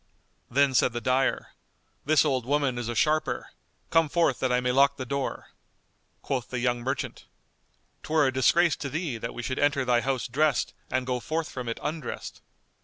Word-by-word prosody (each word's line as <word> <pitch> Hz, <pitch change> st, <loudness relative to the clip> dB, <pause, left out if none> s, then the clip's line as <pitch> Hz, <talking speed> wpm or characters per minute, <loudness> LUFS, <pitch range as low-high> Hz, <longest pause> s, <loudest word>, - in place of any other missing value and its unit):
Then 140 Hz, +1 st, +3 dB
said 125 Hz, -1 st, +3 dB
the 120 Hz, -, -2 dB
dyer, 130 Hz, +3 st, 0 dB, 0.6 s
"This 155 Hz, +2 st, +4 dB
old 130 Hz, -4 st, +1 dB
woman 135 Hz, -1 st, 0 dB
is 120 Hz, -1 st, -4 dB
a 120 Hz, -, -3 dB
sharper. 155 Hz, +5 st, 0 dB, 0.4 s
Come 165 Hz, -2 st, +4 dB
forth, 165 Hz, -5 st, +2 dB
that 130 Hz, -, 0 dB
I 125 Hz, -, +3 dB
may 125 Hz, 0 st, 0 dB
lock 140 Hz, +2 st, +4 dB
the 130 Hz, -, -4 dB
door." 140 Hz, +1 st, -3 dB, 0.7 s
Quoth 130 Hz, -3 st, -2 dB
the 125 Hz, -, -3 dB
young 120 Hz, 0 st, 0 dB
merchant, 135 Hz, +3 st, -4 dB, 0.8 s
"'Twere 155 Hz, -1 st, +2 dB
a 130 Hz, -, +1 dB
disgrace 160 Hz, +6 st, +4 dB
to 140 Hz, -, -4 dB
thee 150 Hz, -5 st, -3 dB
that 115 Hz, -, -5 dB
we 120 Hz, -, -5 dB
should 130 Hz, +2 st, -3 dB
enter 140 Hz, -2 st, +2 dB
thy 120 Hz, -1 st, +3 dB
house 130 Hz, 0 st, -1 dB
dressed 150 Hz, +5 st, +1 dB, 0.2 s
and 130 Hz, 0 st, -1 dB
go 125 Hz, -1 st, -1 dB
forth 160 Hz, +5 st, -3 dB
from 125 Hz, -2 st, -5 dB
it 115 Hz, -, -4 dB
undressed." 150 Hz, -4 st, -5 dB
130 Hz, 185 wpm, -27 LUFS, 125-145 Hz, 0.8 s, This